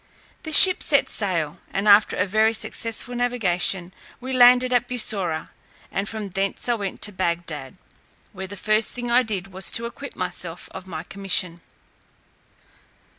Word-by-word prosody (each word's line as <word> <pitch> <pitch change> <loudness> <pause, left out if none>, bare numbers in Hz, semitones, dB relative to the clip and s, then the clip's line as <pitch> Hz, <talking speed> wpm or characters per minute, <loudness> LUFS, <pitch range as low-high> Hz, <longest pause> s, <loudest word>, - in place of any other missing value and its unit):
The 315 - -8
ship 365 +4 +8
set 280 - +3
sail, 170 -8 -2
and 195 +2 -2
after 205 +1 +5
a 185 - +1
very 215 +3 +1
successful 230 +2 -2
navigation 190 -7 -1 0.3
we 260 +1 -6
landed 250 0 +5
at 245 -1 +1
Bussorah, 200 -10 -1 0.4
and 195 +1 -3
from 215 -2 -6
thence 195 +4 -3
I 240 - +2
went 200 -4 -5
to 210 - +2
Bagdad, 170 -7 -4 0.6
where 190 -1 -7
the 200 +1 -10
first 215 +2 0
thing 240 -1 -5
I 245 +1 +5
did 195 -5 -5
was 190 +1 0
to 235 - +1
acquit 280 +4 -8
myself - - -6
of 185 - -10
my 180 - -6
commission. 185 -3 -1
205 Hz, 155 wpm, -22 LUFS, 185-240 Hz, 0.6 s, ship